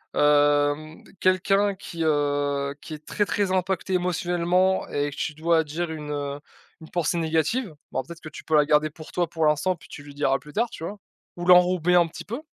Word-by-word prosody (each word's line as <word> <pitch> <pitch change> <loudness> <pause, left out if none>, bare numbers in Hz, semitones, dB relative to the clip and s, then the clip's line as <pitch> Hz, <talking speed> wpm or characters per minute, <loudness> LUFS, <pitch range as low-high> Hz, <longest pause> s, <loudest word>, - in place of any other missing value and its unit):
Hem, 145 +1 +2 0.2
quelqu'un 195 +2 +3
qui, 170 -3 -8
heu, 145 -2 0
qui 160 - -8
est 150 0 -15
très, 205 - 0
très 200 -1 0
impacté 190 0 -1
émotionnellement 180 +1 +1
et 145 0 -1
que - - -9
tu 150 - -3
dois 165 +1 +2
dire 160 +3 -4
une, 150 -2 -6
heu, 145 -1 -3 0.4
une 160 - -12
pensée 175 0 0
négative. 165 - 0 0.2
Bon, 130 - -1
peut-être 170 +5 -11
que 155 - -8
tu 145 - -11
peux 160 - 0
la 150 -1 +5
garder 150 +1 +3
pour 155 +1 -12
toi 175 -1 +1
pour 160 -1 -1
l'instant 150 +5 +2
puis 170 - -17
tu 150 - -10
lui 145 0 -12
diras 135 -2 +2
plus 150 +3 -14
tard, 230 +8 0
tu 160 - -9
vois? 200 +5 -5 0.4
Ou 175 - -4
l'enrober 180 -1 +5
un 175 -1 +5
petit 165 - -9
peu. 235 +7 -5
160 Hz, 210 wpm, -25 LUFS, 150-180 Hz, 0.4 s, la